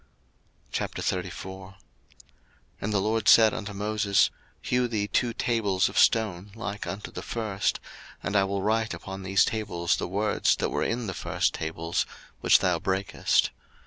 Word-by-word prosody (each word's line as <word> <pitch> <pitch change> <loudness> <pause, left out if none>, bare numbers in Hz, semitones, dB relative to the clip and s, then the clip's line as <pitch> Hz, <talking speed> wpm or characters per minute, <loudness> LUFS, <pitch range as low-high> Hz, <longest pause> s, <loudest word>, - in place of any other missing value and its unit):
02:034:001 95 +1 -4 1.1
And 105 - -2
the 105 - +2
LORD 110 +2 0
said 110 -2 +7
unto 105 -1 -5
Moses, 100 -1 +2 0.3
Hew 125 0 +1
thee 105 -3 -1
two 120 +3 +1
tables 105 -5 +1
of - - 0
stone 105 -3 +2
like 105 -3 -5
unto 100 +1 -5
the - - -6
first: 105 -4 -1 0.4
and 100 - -2
I 100 - +5
will 100 0 -2
write 110 -2 +1
upon 95 +3 -7
these 95 +1 +3
tables 90 -6 -1
the - - -3
words 105 +3 +1
that - - -2
were - - -1
in 120 0 -1
the 95 - -3
first - - 0
tables, 80 +2 -2 0.3
which - - +6
thou - - +2
brakest. 95 +1 +1
100 Hz, 150 wpm, -27 LUFS, 95-110 Hz, 1.1 s, said